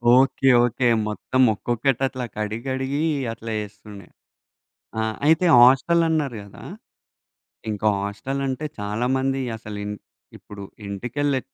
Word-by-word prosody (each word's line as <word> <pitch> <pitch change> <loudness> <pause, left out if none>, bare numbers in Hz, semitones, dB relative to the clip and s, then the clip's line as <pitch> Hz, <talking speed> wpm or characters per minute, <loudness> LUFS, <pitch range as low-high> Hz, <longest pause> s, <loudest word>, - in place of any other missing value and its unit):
Okay, 135 +1 +3
okay. 120 +1 +1 0.2
మొత్తం 120 +4 -1
ఒక్కొక్కటి 120 +4 -1
అట్లా 130 -1 -5
కడిగి 105 +1 -3
కడిగి 130 +2 -2 0.3
అట్లా 115 0 -7
చేస్తుండే. 105 -2 -10 0.9
ఆ! - - +1 0.3
అయితే 160 +3 +4
హాస్టల్ 135 +7 +5
అన్నారు 150 -7 0
గదా! 100 -1 -13 1.1
ఇంకా 105 0 0
హాస్టల్ 100 +7 -4
అంటే 135 +3 -3
చాలా 105 +4 -2
మంది 135 0 0 0.2
అసలు 105 -2 -8
ఇం 105 - -4 0.5
ఇప్పుడు 100 -1 -10 0.2
ఇంటికెళ్ళి 130 +7 -2
120 Hz, 120 wpm, -23 LUFS, 105-135 Hz, 1.1 s, హాస్టల్